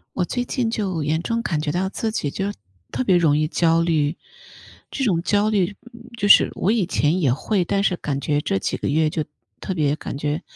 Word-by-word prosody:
我 180 - +1
最 245 +6 -2
近 245 -2 -1
就 195 -8 -2
严 160 +3 0
重 230 +4 -1
感 160 -9 -1
觉 150 -1 -2
到 185 +4 0
自 220 +3 -3
己 150 -9 -2
就 195 +7 -3 0.4
特 255 - -2
别 190 -6 +4
容 160 -4 +3
易 155 - +1
焦 165 +1 +2
虑， 160 -2 +1 0.7
这 270 - -2
种 175 -8 +1
焦 205 +3 +2
虑 200 -2 0 0.2
嗯， 235 +1 -14
就 205 - 0
是 - - +7
我 200 - +1
以 220 -6 +1
前 165 0 +1
也 140 -7 +3
会， 185 - 0
但 200 +3 0
是 185 - +2
感 140 -4 -3
觉 145 +1 0
这 145 -10 -1
几 - - -2
个 - - -3
月 155 +2 +2
就 155 0 -2 0.4
特 190 - -3
别 150 -4 +1
感 150 - -6
觉 150 +3 -2
175 Hz, 245 characters per minute, -22 LUFS, 150-205 Hz, 0.7 s, 是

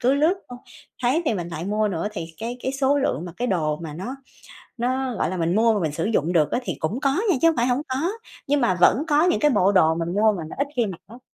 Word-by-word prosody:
cứ 255 +2 +3
lướt 310 +6 +3
thôi, 245 - -9 0.4
thấy 260 +8 +2
thì 230 - +1
mình 175 -3 -4
lại 165 -1 -5
mua 210 +2 0
nữa, 180 +1 -2
thì 170 -6 -5
cái 235 +2 -4
cái 260 - -2
số 275 +1 +2
lượng 265 - -1
mà 175 - -7
cái 245 - -2
đồ 155 -6 0
mà 160 -1 -7
nó 230 - -6 0.6
nó, 255 +2 -1
gọi - - 0
là, 185 - -3
mình 170 +1 0
mua 225 +1 +4
mà 210 - 0
mình 160 -5 -1
sử 160 +4 -3
dụng 180 -6 0
được 155 -4 +2
á, - - +1
thì - - -3
cũng 195 +11 -2
có 280 +6 +1
nha 370 - +4
chứ 330 - +6
hông 325 - +3
phải 240 +1 +2
hổng 250 +2 +1
có, 275 +7 -1 0.4
nhưng 285 0 +2
mà 215 -6 +3
vẫn 245 +10 +5
có 300 0 +3
những 355 0 +2
cái 300 -1 +3
bộ 195 -5 +3
đồ 160 -5 +4
mình 170 +1 -3
mua 215 +2 +4
mà 175 -5 -5
nó - - -8
ít 280 - +1
khi 240 -2 +2
mặc 190 -5 -6
lắm. 235 +5 -14
225 Hz, 290 wpm, -23 LUFS, 175-265 Hz, 0.6 s, chứ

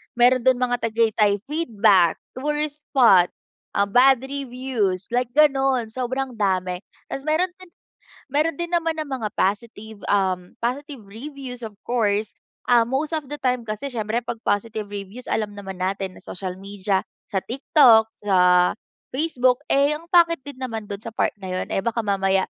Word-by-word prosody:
meron 245 0 +4
do'n 260 -1 +6
mga 245 -1 +1
Tagaytay 220 -3 +2
feedback, 215 - +3 0.2
tourist 295 +1 -2
spot, 195 -10 +6 0.5
ah, 200 0 +2
bad 255 +3 +5
reviews 250 -8 -2
like 245 0 +1
gano'n 270 -5 +3
sobrang 255 0 -3
dami. 185 -3 0 0.3
Tas 275 - -5
meron 320 +4 +2
din 370 -1 -14 0.6
meron 305 +1 +1
din 345 0 -4
naman 330 -2 +1
ng 310 - -2
mga 215 - -1
positive, 215 +1 -2
um, 185 -3 0
positive 270 0 -3
reviews 255 +3 -8
of 215 -2 -7
course, 215 -3 0 0.4
ah, 240 -1 +7
most 285 +5 -1
of 305 -4 -3
the 295 - -4
time 250 -4 -1
kasi 215 +6 -4
siyempre 225 +1 -2
'pag 230 -1 -5
positive 215 0 -1
reviews, 205 +4 -8
alam 215 -2 -1
naman 195 -2 -7
natin 190 0 -2
sa - - -10
social 185 0 -5
media, 195 0 -2 0.3
sa 195 - 0
TikTok, 235 -3 +5 0.2
sa 195 -2 +2 0.8
Facebook, 260 -3 +1
eh, 280 +2 +3
ang 335 +3 -10
pangit 335 -4 +4
din 280 -1 -10
naman 225 -5 -5
do'n 200 - -4
sa 225 +2 -9
part - - +1
na 195 - -8
'yun, 185 0 -3
eh, - - 0
baka 230 +3 -1
mamaya 195 -2 +1
235 Hz, 160 wpm, -23 LUFS, 205-275 Hz, 0.8 s, ah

